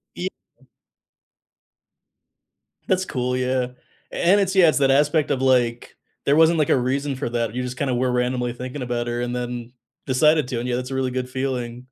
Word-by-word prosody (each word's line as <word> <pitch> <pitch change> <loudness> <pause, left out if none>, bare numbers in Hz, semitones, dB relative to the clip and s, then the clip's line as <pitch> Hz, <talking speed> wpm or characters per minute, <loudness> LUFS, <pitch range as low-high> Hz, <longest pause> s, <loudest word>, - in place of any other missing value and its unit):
Yeah. - - -2 2.6
That's 185 -1 +1
cool, 125 -4 -2
yeah. 130 0 0 0.4
And 195 +4 +3
it's 190 0 0
yeah, 180 -4 +6
it's 150 - +2
that 135 -1 +3
aspect 150 +2 +2
of 130 -1 0
like, 120 -3 +1 0.3
there 140 - +4
wasn't, 160 +1 +5
like, 150 - +2
a - - +4
reason 135 +2 -1
for 130 -3 -3
that 115 -1 -2
you 125 - -2
just 125 0 -5
kinda 130 -2 -1
were 125 +1 +1
randomly 125 0 0
thinking 130 +3 -6
about 120 -1 -2
her 120 0 -2
and 120 0 -2
then 120 -1 -5 0.3
decided 150 +1 +3
to, 120 - -2
and 125 - -4
yeah, 120 - 0
that's 125 +1 -4
a - - -3
really 130 -1 0
good 125 0 -3
feeling. 125 -2 -4
130 Hz, 190 wpm, -22 LUFS, 125-140 Hz, 2.6 s, yeah